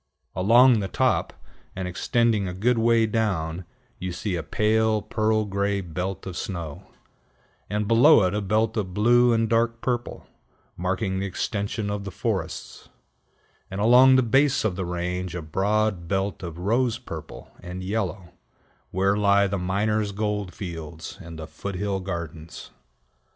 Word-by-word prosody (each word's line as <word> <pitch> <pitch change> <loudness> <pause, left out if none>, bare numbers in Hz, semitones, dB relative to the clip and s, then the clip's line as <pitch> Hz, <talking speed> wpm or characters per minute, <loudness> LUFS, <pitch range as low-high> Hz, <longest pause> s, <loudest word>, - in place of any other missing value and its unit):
Along 120 +5 +6
the 100 - -2
top, - - +1 0.4
and 95 -1 -3
extending 105 +3 +1
a 90 - -5
good 115 +5 +2
way 115 0 +4
down, 95 -7 -1 0.3
you 90 0 -4
see 95 +2 -3
a 85 - -2
pale, 110 +3 +1
pearl 110 -1 +1
gray 100 0 -1
belt 90 +1 -4
of 95 -2 -6
snow; 85 -7 -6 0.8
and 105 0 -1
below 115 +2 +6
it 90 0 +1
a 105 - -1
belt 110 +3 +1
of 95 -4 -3
blue 120 +3 +4
and 115 -1 +2
dark 115 +1 +1
purple, 120 -1 -3 0.5
marking 95 +2 -1
the 100 - -2
extension 100 +2 -3
of 100 0 -3
the 100 - -5
forests; - - -4 0.8
and 95 - -5
along 125 +5 +7
the 130 - +4
base 135 +2 +2
of 100 -5 0
the 95 0 -3
range 90 0 -3
a 90 - -3
broad 95 +2 0
belt 95 -1 -1
of 85 -3 -7
rose 115 +6 +1
purple - - -9
and 90 +1 -7
yellow, 95 -3 -3 0.6
where 95 +2 +1
lie 100 -1 +4
the 100 0 -2
minor's 105 +3 0
gold 105 -2 -2
fields 80 -3 -7
and 85 -2 -9
the 80 - -6
foot 100 +4 -7
hill 100 +1 -1
gardens. 85 -3 -7
100 Hz, 155 wpm, -25 LUFS, 90-110 Hz, 0.8 s, along